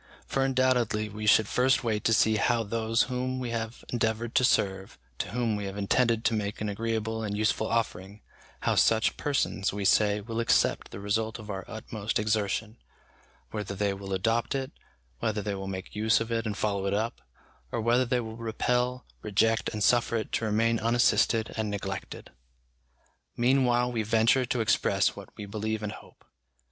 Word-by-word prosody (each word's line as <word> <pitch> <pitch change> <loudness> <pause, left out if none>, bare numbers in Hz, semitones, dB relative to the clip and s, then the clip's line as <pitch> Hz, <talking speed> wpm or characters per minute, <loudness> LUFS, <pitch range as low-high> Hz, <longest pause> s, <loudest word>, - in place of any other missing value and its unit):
For 135 - 0
undoubtedly 125 -5 +1
we 105 +1 -5
should 110 0 +5
first 130 +3 +2
wait 110 -3 -1
to 115 - +4
see 110 0 +3
how 115 +2 +2
those 115 +2 +1
whom 130 0 -2
we 125 -2 -3
have 115 0 -4
endeavoured 115 0 -1
to - - +3
serve, 95 -5 +1 0.2
to - - -2
whom 115 0 0
we 105 -1 -4
have 100 +1 -5
intended 115 +3 +1
to 115 - +3
make 105 -1 -2
an 105 - -2
agreeable 110 +1 -2
and 105 -2 -3
useful 110 +1 +1
offering, 105 -3 -2 0.4
how - - +1
such 110 0 +3
persons, 135 -8 0
we 100 0 -4
say, 105 +1 +4
will 115 +2 -5
accept 115 - +2
the - - -8
result 110 +3 -1
of 110 -2 -8
our 95 -1 -5
utmost 110 -1 -3
exertion: 110 +1 -1 0.7
whether 105 -2 -4
they 100 0 0
will 95 0 -8
adopt 115 +7 0
it, 135 -1 -3 0.5
whether 105 +3 -1
they 105 0 -2
will 95 0 -5
make 95 0 -6
use 110 +1 +3
of 115 0 -4
it 115 -1 -1
and 105 -1 -3
follow 100 -2 -1
it 100 - 0
up, 110 +3 -2 0.5
or - - -2
whether 120 +3 +3
they 125 0 0
will 110 -1 -6
repel, 125 +2 -1 0.2
reject, 110 +2 +1
and 105 -2 -3
suffer 120 0 +3
it 110 - -2
to 115 - -1
remain 115 +2 +2
unassisted 115 -1 +2
and 110 -1 -2
neglected. 95 -1 -5 1.1
Meanwhile, 125 -1 +3
we 115 -2 -1
venture 115 +4 +3
to 120 0 0
express 110 - +2
what - - -10
we 105 - -6
believe 110 +1 -3
and 105 - -2
hope. - - -14
110 Hz, 180 wpm, -28 LUFS, 105-115 Hz, 1.1 s, should